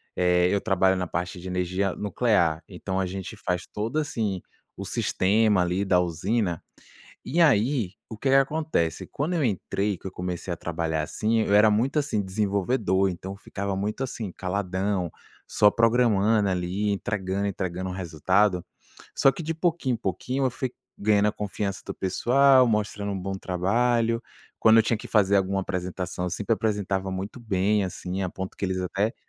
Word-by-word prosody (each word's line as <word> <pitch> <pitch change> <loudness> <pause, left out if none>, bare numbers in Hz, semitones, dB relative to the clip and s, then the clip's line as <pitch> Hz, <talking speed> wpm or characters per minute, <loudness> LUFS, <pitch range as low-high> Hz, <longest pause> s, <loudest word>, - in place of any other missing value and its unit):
eh, 90 0 +3
eu 100 - +2
trabalho 95 -2 +2
na 90 -1 -1
parte 90 +1 -4
de 90 - -8
energia 90 +1 -1
nuclear, 100 -7 +1
então 95 0 -4
a 95 - +1
gente 95 +3 -6
faz 90 -4 -2
todo, 110 +7 -3
assim, 110 - -2 0.3
o - - -6
sistema 105 +1 +2
ali 90 +3 0
da 90 -2 +4
usina. 90 +2 -1 0.6
E 165 +6 0
aí 125 - +3 0.2
o 110 - -7
que 135 - -1
que - - +5
acontece, 135 - +1
quando 155 +6 -2
eu 160 -4 +1
entrei, 100 -2 -1
que - - -26
eu - - -3
comecei 90 0 -4
a - - -3
trabalhar 80 -1 -2
assim, 110 +8 0
eu 100 - +1
era 105 +1 +7
muito, 120 +8 +1
assim, 140 -8 0
desenvolvedor, 100 0 +1
então 95 +2 -6
ficava 100 -1 -4
muito 105 +6 -2
assim 115 -7 -4
caladão, 95 0 -2 0.4
só 105 - +4
programando 115 -3 +3
ali, 95 +3 -1
entregando 100 -1 -2
entregando 95 -2 -3
o - - -4
resultado. 90 +2 +1 0.5
Só 135 - +6
que 170 - -7
de 165 +1 -2
pouquinho 165 -6 0
em - - -1
pouquinho 125 +8 -2
eu - - 0
fui 125 +1 -4 0.3
ganhando 105 0 +3
a - - -1
confiança 100 -2 -4
do - - -4
pessoal, 130 +7 +4
mostrando 105 -2 -1
um 95 - -3
bom 95 +1 -3
trabalho. 115 +6 +1 0.4
Quando 110 0 +6
eu - - +6
tinha 115 +1 +1
que - - -8
fazer 100 -2 +4
alguma 95 0 +1
apresentação, 90 -1 -4
eu - - -2
sempre 100 +5 -1
apresentava 100 -3 -1
muito 95 +6 -5
bem, 105 -1 +1
assim, 95 +1 -4
a 95 - -1
ponto 95 +1 -6
que - - -3
eles 95 -1 -1
até 95 +4 -1
100 Hz, 175 wpm, -26 LUFS, 90-110 Hz, 0.6 s, era